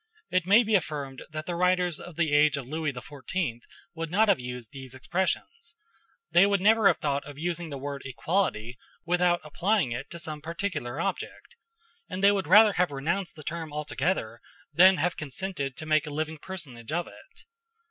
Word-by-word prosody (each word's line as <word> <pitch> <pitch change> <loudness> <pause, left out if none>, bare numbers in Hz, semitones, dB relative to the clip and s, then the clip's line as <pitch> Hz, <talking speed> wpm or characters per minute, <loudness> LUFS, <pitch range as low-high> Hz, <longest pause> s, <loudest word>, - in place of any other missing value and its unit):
It 185 -1 +1
may 210 +5 +7
be 220 0 -1
affirmed 145 -8 -1
that 155 0 -6
the 175 - -3
writers 180 -2 +1
of 175 - -10
the 165 -2 +1
age 150 -1 +5
of 135 -3 -6
Louis 155 +1 -2
XIV 135 +2 -4 0.3
would 165 -1 -4
not 210 +5 +3
have 195 - +4
used 125 -2 -7
these 130 -2 -10
expressions: 325 - -3 0.6
they 190 +3 +6
would 200 -1 +2
never 215 +2 +5
have 185 - +4
thought 145 -1 -1
of 145 -1 -10
using 170 +1 -3
the 140 - -5
word 140 0 -5
"equality" 125 - -1 0.3
without 175 0 +2
applying 175 - 0
it 125 +4 -5
to 170 - -7
some 155 -3 -6
particular 165 -5 -4
object; 195 +1 -4 0.5
and 185 +1 -4
they 200 - +8
would 195 -5 -1
rather 210 +4 +7
have 180 -1 +2
renounced 170 +7 -2
the 155 - -11
term 160 0 -5
altogether 150 -3 -2 0.3
than 185 +4 +7
have 175 +4 0
consented 145 -2 -4
to 155 - -7
make 155 0 +2
a - - -3
living 155 +1 -3
personage 150 -10 -8
of 170 +2 0
it. - - -16
165 Hz, 185 wpm, -27 LUFS, 145-185 Hz, 0.6 s, they